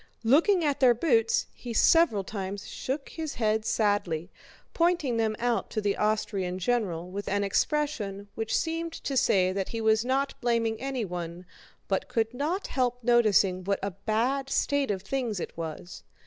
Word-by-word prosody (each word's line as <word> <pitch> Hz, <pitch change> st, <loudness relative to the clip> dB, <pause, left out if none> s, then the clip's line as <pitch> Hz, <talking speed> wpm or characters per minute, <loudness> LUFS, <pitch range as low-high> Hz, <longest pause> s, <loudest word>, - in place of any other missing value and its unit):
Looking 330 Hz, -, +4 dB
at 285 Hz, -2 st, 0 dB
their 250 Hz, -3 st, +5 dB
boots 230 Hz, -4 st, +2 dB
he 240 Hz, -2 st, -7 dB
several 325 Hz, -12 st, +4 dB
times 195 Hz, 0 st, -5 dB
shook 275 Hz, +2 st, -4 dB
his 315 Hz, -2 st, -5 dB
head 220 Hz, -1 st, 0 dB
sadly, 205 Hz, -7 st, 0 dB, 0.4 s
pointing 335 Hz, -8 st, +1 dB
them 220 Hz, -1 st, +1 dB
out 240 Hz, -1 st, 0 dB
to 220 Hz, -, -2 dB
the 205 Hz, -1 st, 0 dB
Austrian 200 Hz, -4 st, -1 dB
general 185 Hz, -5 st, -1 dB
with 200 Hz, +2 st, -5 dB
an 205 Hz, +1 st, +1 dB
expression 205 Hz, -3 st, -1 dB
which 225 Hz, 0 st, -1 dB
seemed 330 Hz, 0 st, -2 dB
to 275 Hz, -, -4 dB
say 185 Hz, -7 st, +3 dB
that 195 Hz, -1 st, -2 dB
he 230 Hz, -, -4 dB
was 220 Hz, 0 st, +3 dB
not 270 Hz, +2 st, -1 dB
blaming 230 Hz, -2 st, 0 dB
anyone, 180 Hz, -10 st, -4 dB, 0.4 s
but 195 Hz, -, -1 dB
could 225 Hz, 0 st, -1 dB
not 310 Hz, +9 st, -2 dB
help 245 Hz, -2 st, -1 dB
noticing 210 Hz, -6 st, +3 dB
what 200 Hz, +1 st, 0 dB
a 200 Hz, -, -1 dB
bad 230 Hz, +8 st, -1 dB
state 285 Hz, -1 st, +1 dB
of 190 Hz, -2 st, -2 dB
things 235 Hz, -3 st, -2 dB
it -, -, -6 dB
was. 165 Hz, +2 st, -7 dB
225 Hz, 160 wpm, -28 LUFS, 200-265 Hz, 0.4 s, their